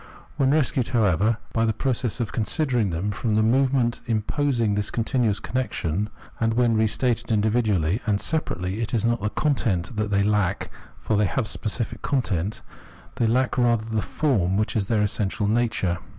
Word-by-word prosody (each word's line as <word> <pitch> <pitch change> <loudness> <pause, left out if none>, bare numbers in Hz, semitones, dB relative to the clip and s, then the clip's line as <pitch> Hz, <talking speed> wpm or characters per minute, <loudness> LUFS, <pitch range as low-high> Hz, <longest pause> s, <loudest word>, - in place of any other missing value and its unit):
When 135 -1 +2
rescued, 135 -4 +1
however, 110 -2 +2 0.2
by 115 - +1
the 110 -1 +2
process 125 -4 -1
of 115 -3 -2
considering 120 -1 +1
them, 90 +5 -2
from 110 +1 -1
the 110 - +3
movement 130 0 +2
imposing 115 0 0
this 105 0 -1
continuous 115 -3 0
connection, 105 -6 -2 0.3
and 115 0 +1
when 120 -1 +3
reinstated 115 +2 +1
individually 105 -4 +1
and 100 -2 +2
separately, 100 - -2
it 115 +1 -1
is 110 -1 +1
not 120 -2 +1
the 105 - 0
content 115 - 0
that 105 0 0
they 100 -1 +2
lack, 105 -3 0 0.3
for 110 - -1
they 105 0 +3
have 120 +5 -1
a - - -7
specific 110 +2 -3
content; 105 - -1 0.5
they 115 - +2
lack 125 +2 +1
rather 120 -2 +2
the 110 -1 -1
form, 100 - 0
which 110 +4 -1
is 100 -3 0
their 105 -1 +2
essential 105 +1 0
nature. 110 -6 0
110 Hz, 170 wpm, -24 LUFS, 105-120 Hz, 0.5 s, the